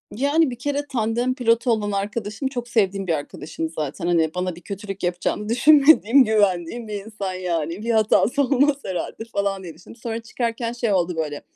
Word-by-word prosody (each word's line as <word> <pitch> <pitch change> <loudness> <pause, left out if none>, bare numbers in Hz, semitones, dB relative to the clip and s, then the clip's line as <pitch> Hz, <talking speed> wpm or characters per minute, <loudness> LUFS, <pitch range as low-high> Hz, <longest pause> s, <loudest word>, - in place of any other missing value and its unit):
Yani, 285 +5 +2
bir 245 - -5
kere, 285 +2 -2
tandem 240 0 0
pilotu 240 -1 +2
olan 210 -2 0
arkadaşım 210 +5 -3
çok 245 -3 -5
sevdiğim 195 -5 0
bir 170 - +2
arkadaşım 155 +1 -5
zaten. 155 +1 -4
Hani, 165 -2 +2
bana 180 -1 -2
bir 175 - -13
kötülük 195 +1 -7
yapacağını 180 +4 -2
düşünmediğim, 280 0 +6
güvendiğim 210 0 0
bir 205 -1 -5
insan 200 -4 -5
yani. 175 0 -3
Bir 230 - -4
hatası 220 +4 +3
olmaz 280 +1 +3
herhâlde 190 +4 -4
falan 200 -1 -1
diye 170 -3 -8
düşündüm. 180 - -14
Sonra 230 -1 -3
çıkarken 230 0 -3
şey 235 -3 0
oldu 180 -2 +1
böyle, 150 -2 -3
210 Hz, 175 wpm, -22 LUFS, 180-240 Hz, -, düşünmediğim